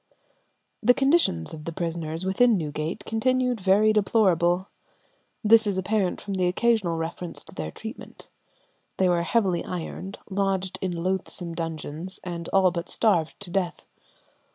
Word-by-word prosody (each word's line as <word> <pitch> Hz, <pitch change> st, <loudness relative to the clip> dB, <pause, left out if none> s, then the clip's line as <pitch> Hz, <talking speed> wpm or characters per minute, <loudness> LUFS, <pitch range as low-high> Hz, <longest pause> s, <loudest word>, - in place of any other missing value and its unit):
The 245 Hz, +2 st, +5 dB
condition 270 Hz, -, +3 dB
of 155 Hz, -1 st, -9 dB
the 165 Hz, -, -3 dB
prisoners 165 Hz, 0 st, -3 dB
within 220 Hz, +4 st, +4 dB
Newgate 155 Hz, +5 st, -4 dB
continued 250 Hz, +1 st, +1 dB
very 205 Hz, +3 st, +4 dB
deplorable. 185 Hz, -4 st, +2 dB, 0.8 s
This 220 Hz, 0 st, +6 dB
is 200 Hz, -2 st, 0 dB
apparent 190 Hz, -1 st, 0 dB
from 200 Hz, -, -5 dB
the 185 Hz, -1 st, +1 dB
occasional 195 Hz, -3 st, +1 dB
references 165 Hz, +1 st, -5 dB
to -, -, -12 dB
their 80 Hz, -1 st, -4 dB
treatment. 220 Hz, -, -9 dB, 0.7 s
They 190 Hz, -, +3 dB
were 175 Hz, -1 st, +2 dB
heavily 185 Hz, -1 st, +1 dB
ironed, 185 Hz, +2 st, -6 dB
lodged 195 Hz, -1 st, -1 dB
in 185 Hz, -, -1 dB
loathsome 185 Hz, -2 st, -2 dB
dungeons, 165 Hz, +2 st, -5 dB
and 170 Hz, -2 st, -5 dB
all 190 Hz, -2 st, +4 dB
but 170 Hz, 0 st, -4 dB
starved 175 Hz, -8 st, +1 dB
to 185 Hz, -3 st, -6 dB
death. 180 Hz, -3 st, -2 dB
185 Hz, 140 wpm, -25 LUFS, 170-210 Hz, 0.8 s, This